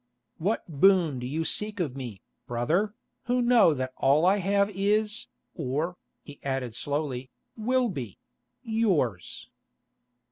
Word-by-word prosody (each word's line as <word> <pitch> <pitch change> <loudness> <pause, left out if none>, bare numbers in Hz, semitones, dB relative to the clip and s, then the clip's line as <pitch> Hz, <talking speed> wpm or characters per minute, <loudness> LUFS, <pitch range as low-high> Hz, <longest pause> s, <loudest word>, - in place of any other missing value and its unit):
"What 200 +7 0
boon 165 -3 +4
do 125 - -4
you 155 +5 -1
seek 210 +3 -2
of 150 -8 -1
me, 120 -8 -7 0.2
brother, 170 - 0 0.3
who 245 +1 +1
know 240 -9 +5
that 130 -1 -3
all 145 +5 +4
I 190 +3 +5
have 200 +1 +2
is, 210 +3 0 0.3
or," 150 +7 -2 0.3
he 145 -1 -12
added 130 -4 -2
slowly, 135 -1 -3 0.3
"will 250 +3 +1
be—yours?" 125 - -3
160 Hz, 120 wpm, -27 LUFS, 130-205 Hz, 0.3 s, know